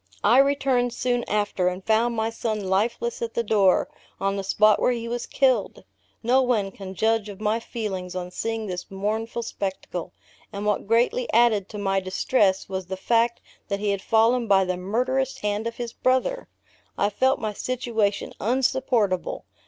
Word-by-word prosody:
I 240 +5 +6
returned 270 -3 +2
soon 245 -1 0
after, 205 -3 0
and 180 +1 -3
found 230 +2 +2
my 220 0 -1
son 225 -1 -2
lifeless 225 +5 0
at 230 -1 -4
the 235 - +1
door, 200 -4 +3 0.3
on 195 0 0
the 195 - -3
spot 210 +2 +4
where - - +3
he 235 -1 -4
was 240 +1 -3
killed! 255 -6 +1 0.4
No 250 +3 +4
one 225 -6 +1
can 190 -1 -9
judge 220 +1 +1
of 200 -1 -9
my 215 +1 0
feelings 190 -6 -5
on 180 -1 -4
seeing 225 +2 -3
this 180 -2 -5
mournful 220 +4 -3
spectacle; 190 -4 -5 0.4
and 200 +1 -5
what 210 -1 0
greatly 235 +2 +2
added 220 -4 +3
to 210 - -7
my 195 -1 +1
distress, 190 +1 +1
was 190 -2 -4
the 190 0 -4
fact 235 +4 +1 0.3
that 200 -1 -2
he 205 0 0
had 200 -1 -2
fallen 230 +2 +3
by 195 -2 +4
the 185 0 -1
murderous 250 +8 -1
hand 210 +2 -1
of 230 - -5
his 235 -1 -5
brother! 260 - 0 0.5
I 205 +1 +1
felt 260 +6 +2
my 215 -2 -3
situation 225 -3 -1
unsupportable. 245 -5 0
220 Hz, 175 wpm, -24 LUFS, 195-240 Hz, 0.5 s, I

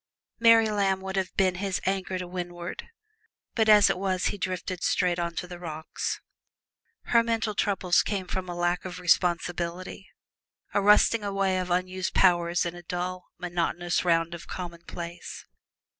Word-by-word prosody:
Mary 230 -1 +6
Lamb 200 -3 +1
would 190 0 -5
have 190 -1 -1
been 190 -2 +3
his 195 -2 -1
anchor 190 -1 -1
to 180 - -4
win'ard, 175 -1 -6 0.7
but 220 -2 +2
as 210 -1 +8
it - - 0
was 185 -1 -1
he - - -6
drifted 185 -1 -3
straight 180 -1 +1
on 170 -1 -2
to 170 - -3
the 175 -1 -9
rocks. 160 -2 -4 0.8
Her 235 - +4
mental 225 -2 -1
troubles 195 -3 +2
came 195 -3 -2
from 185 0 -4
a 175 - -4
lack 175 0 0
of 180 -1 -7
responsibility 180 +1 0 0.6
a 205 - +2
rusting 210 +2 +5
away 195 -2 0
of 180 0 -3
unused 185 +1 -1
powers 175 -2 +3
in 170 - -3
a 175 - -10
dull, 180 +1 -4
monotonous 175 0 -1
round 165 -1 +2
of 170 - -9
commonplace. 170 -1 -7
180 Hz, 160 wpm, -27 LUFS, 175-195 Hz, 0.8 s, as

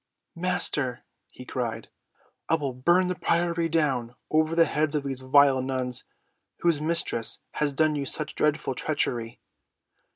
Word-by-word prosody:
"Master," 160 -8 +1 0.3
he 125 - -12
cried, 115 -3 -4 0.6
"I - - +5
will 140 -5 -3
burn 175 +9 +3
the 180 - 0
priory 170 -1 0
down 135 -7 0 0.2
over 155 +1 +2
the 165 0 +5
heads 150 -1 0
of 145 - 0
these 135 -2 -4
vile 135 0 +4
nuns 130 -1 -3 0.6
whose 165 -4 +2
mistress 155 -8 +1
has 150 -1 -1
done 155 +1 +3
you 140 -2 -2
such 155 +2 -2
dreadful 150 -3 0
treachery." 120 -5 -2
145 Hz, 140 wpm, -26 LUFS, 130-165 Hz, 0.6 s, I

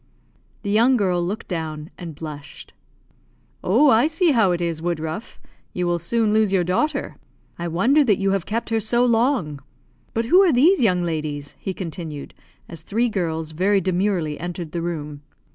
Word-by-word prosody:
The 200 - -2
young 240 +5 +4
girl 180 -4 +1
looked 200 +5 -4
down, 160 -3 -5
and 165 -4 -8
blushed. 150 -2 -9 0.9
"Oh, 260 +10 +4
I 230 +6 +4
see 325 +1 +2
how 220 -8 +3
it 175 - 0
is, 170 -2 -2
Woodruff! 165 +3 -4 0.3
You 180 - -1
will 175 0 0
soon 215 +5 +1
lose 215 -2 +3
your 190 -2 +2
daughter. 185 - -1 0.4
I 170 - -3
wonder 235 - +3
that 210 -6 +3
you 195 0 +1
have 195 -3 -1
kept 230 +3 -2
her 225 0 +1
so 240 +3 +1
long. 225 - +1 0.5
But 230 +1 0
who 360 +11 +6
are 375 -4 +5
these 310 +8 +4
young 180 -6 +2
ladies?" 150 -4 -4
he 190 - -4
continued, 160 -5 -7 0.3
as 165 -2 -9
three 230 +8 0
girls 160 -6 -2
very 195 +5 +2
demurely 180 -4 -1
entered 175 -2 -5
the 170 - -3
room. 150 -4 -5
180 Hz, 175 wpm, -22 LUFS, 165-225 Hz, 0.9 s, who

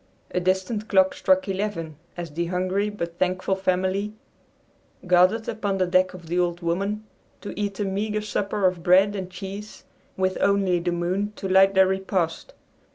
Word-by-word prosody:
A - - 0
distant 190 +4 -1
clock 190 -2 +4
struck 280 -2 +2
eleven 190 -5 -3 0.2
as 170 -3 -5
the 170 +3 -2
hungry 185 +3 0
but 170 -5 -6
thankful 185 +1 0
family 190 +2 0 0.9
gathered 180 +5 +4
upon 205 -3 -2
the 185 - +2
deck 185 +1 +2
of 175 -2 -11
the 175 +2 -1
"Old 175 0 0
Woman" 195 +5 -1 0.4
to - - -6
eat 205 -1 -3
a 205 - 0
meager 210 +2 -1
supper 205 -1 -1
of 180 -2 +1
bread 190 +4 +4
and 190 -2 -4
cheese 195 +3 -8 0.3
with 185 0 0
only 195 -3 +3
the 175 +1 -1
moon 185 +4 -1
to 195 - -5
light 190 +1 +5
their 190 0 +7
repast. 190 - -2
190 Hz, 165 wpm, -24 LUFS, 180-205 Hz, 0.9 s, their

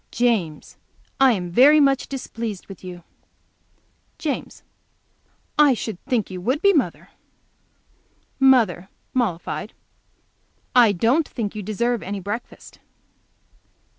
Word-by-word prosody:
"James, 215 -11 -1 0.4
I 265 -2 +6
am 180 -4 -4
very 280 - +6
much 275 -2 +2
displeased 230 -6 -6
with 195 -2 -12
you." 180 -2 -9 1.1
James. 295 -4 -4 1.0
"I 290 -4 +6
should 220 -5 -6
think 245 -7 -1
you 185 -1 -6
would 255 +10 0
be, 400 +3 +4
mother." 295 -7 -1 1.3
Mother, 225 -9 +3 0.2
mollified. 215 -3 -2 1.0
"I 240 -4 +7
don't 235 - +1
think 215 -5 -4
you 215 - -5
deserve 230 +3 -1
any 200 +1 -5
breakfast." 205 +5 -7
230 Hz, 105 wpm, -22 LUFS, 195-265 Hz, 1.3 s, I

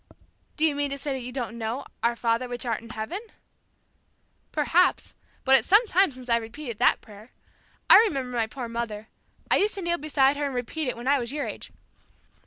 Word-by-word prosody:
"Do 315 - +2
you 310 - +2
mean 285 0 -1
to 280 - -4
say 280 0 -3
that 265 - -4
you 250 +1 -6
don't 240 -3 -5
know, 225 +4 -3 0.2
'Our 235 0 +1
Father 230 +1 0
which 245 0 -6
art 230 -2 -1
in 230 - -13
heaven?'" 220 - -5 1.3
"Perhaps, 325 +4 +2 0.3
but 265 0 +6
it's - - +2
some 415 +6 +6
time 385 -5 +3
since 255 -1 -12
I've 235 -1 +2
repeated 235 0 -7
that - - +3
prayer. 215 +2 -15 0.5
I - - +10
remember 270 - 0
my 230 -2 +1
poor 250 0 -6
mother. 230 -2 -5 0.4
I - - +6
used 420 +2 +1
to 395 - -5
kneel 345 0 0
beside 285 -2 +2
her 290 - -1
and 270 - -5
repeat 255 +5 -3
it 250 - -2
when 240 +2 -7
I 280 0 +4
was 235 0 -4
your 290 0 -2
age. - - -7
255 Hz, 210 wpm, -26 LUFS, 235-295 Hz, 1.3 s, I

